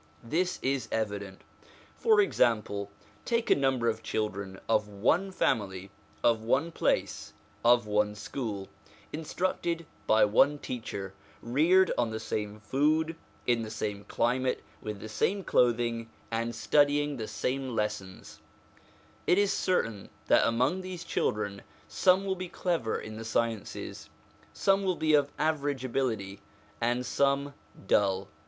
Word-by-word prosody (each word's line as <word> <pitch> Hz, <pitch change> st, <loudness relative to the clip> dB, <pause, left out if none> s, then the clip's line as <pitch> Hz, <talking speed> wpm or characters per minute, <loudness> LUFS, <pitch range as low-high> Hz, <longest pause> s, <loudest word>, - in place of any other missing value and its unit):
This 175 Hz, +9 st, 0 dB
is 130 Hz, -4 st, 0 dB
evident 100 Hz, -3 st, -3 dB, 0.5 s
For 440 Hz, -3 st, +4 dB
example, 105 Hz, -, +1 dB, 0.3 s
take 235 Hz, -1 st, 0 dB
a -, -, +8 dB
number 135 Hz, -4 st, +1 dB
of 110 Hz, -1 st, 0 dB
children 100 Hz, -3 st, -3 dB
of 105 Hz, -2 st, +2 dB
one 120 Hz, -, +1 dB
family, 100 Hz, -, -1 dB, 0.3 s
of 115 Hz, -2 st, +3 dB
one 135 Hz, +9 st, +1 dB
place, -, -, -1 dB, 0.3 s
of 120 Hz, -1 st, +5 dB
one 105 Hz, 0 st, +1 dB
school, 105 Hz, -2 st, -4 dB, 0.5 s
instructed 170 Hz, +1 st, -2 dB, 0.2 s
by 110 Hz, 0 st, +6 dB
one 135 Hz, +8 st, +4 dB
teacher, 100 Hz, -8 st, -5 dB, 0.3 s
reared 165 Hz, +10 st, +4 dB
on 120 Hz, -2 st, +2 dB
the 110 Hz, 0 st, -4 dB
same 105 Hz, -1 st, -4 dB
food, 155 Hz, +9 st, +1 dB, 0.3 s
in 120 Hz, -2 st, +2 dB
the 110 Hz, -, -5 dB
same 105 Hz, -2 st, -4 dB
climate, 125 Hz, +2 st, 0 dB, 0.2 s
with 105 Hz, -2 st, -5 dB
the 110 Hz, -, -7 dB
same 195 Hz, -, 0 dB
clothing, 115 Hz, -3 st, +1 dB, 0.2 s
and 115 Hz, +1 st, -1 dB
studying 145 Hz, +2 st, +2 dB
the 110 Hz, -2 st, -4 dB
same 130 Hz, -1 st, -2 dB
lessons 105 Hz, -3 st, -4 dB, 0.9 s
it 180 Hz, -, +5 dB
is 205 Hz, -1 st, +3 dB
certain 115 Hz, -, 0 dB, 0.2 s
that -, -, +5 dB
among 125 Hz, +11 st, +1 dB
these 185 Hz, -2 st, -6 dB
children 105 Hz, -10 st, -1 dB, 0.3 s
some 190 Hz, +1 st, +3 dB
will 190 Hz, -, +1 dB
be 185 Hz, -1 st, -6 dB
clever 165 Hz, -14 st, -1 dB
in 110 Hz, 0 st, -8 dB
the 115 Hz, -, -6 dB
sciences, 115 Hz, -1 st, -3 dB, 0.4 s
some 195 Hz, 0 st, +2 dB
will 185 Hz, -2 st, +1 dB
be 155 Hz, -1 st, +1 dB
of 145 Hz, -1 st, +4 dB
average 145 Hz, -4 st, 0 dB
ability, 110 Hz, -7 st, -2 dB, 0.4 s
and 120 Hz, +2 st, +1 dB
some 140 Hz, +2 st, +1 dB, 0.3 s
dull. 95 Hz, 0 st, +2 dB
120 Hz, 135 wpm, -29 LUFS, 105-150 Hz, 0.9 s, a